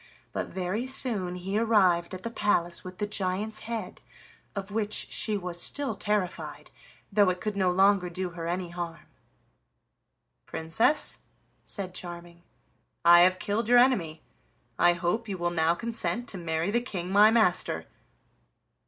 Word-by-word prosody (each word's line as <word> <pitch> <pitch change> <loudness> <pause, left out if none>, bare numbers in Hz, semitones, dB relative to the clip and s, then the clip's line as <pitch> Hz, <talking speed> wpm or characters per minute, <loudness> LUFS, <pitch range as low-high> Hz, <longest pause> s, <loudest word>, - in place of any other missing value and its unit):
But - - -3
very 190 +7 -3
soon 225 -9 +1
he 190 +4 -2
arrived 190 -6 +2
at 185 - -10
the 230 - -4
palace 175 -6 0
with 185 0 -10
the 210 - -1
giant's 205 +2 -2
head, 220 -4 -6 0.5
of 200 0 -5
which 215 0 -2
she 215 -2 +2
was 175 -2 0
still 285 -1 +2
terrified, 205 -4 -3 0.4
though 200 -1 +4
it 180 0 -2
could 215 0 -3
no 190 -2 +1
longer 190 0 +3
do 180 +1 -4
her 165 -1 -6
any 175 +1 -3
harm. 170 -1 -6 1.4
"Princess," 165 - +2 0.4
said 190 -3 -6
Charming, 175 -1 -8 0.6
"I 175 0 +8
have 185 +1 +5
killed 210 +4 -2
your 245 - +6
enemy; 185 -12 +2 0.6
I 175 - +5
hope 180 +7 -2
you 195 -2 -4
will 175 0 -1
now 165 0 +2
consent 235 +3 -2
to 195 - 0
marry 165 +2 -2
the 235 +2 +1
King 185 -7 -5
my 205 +2 +6
master." 225 -1 +1
190 Hz, 150 wpm, -27 LUFS, 175-215 Hz, 1.4 s, I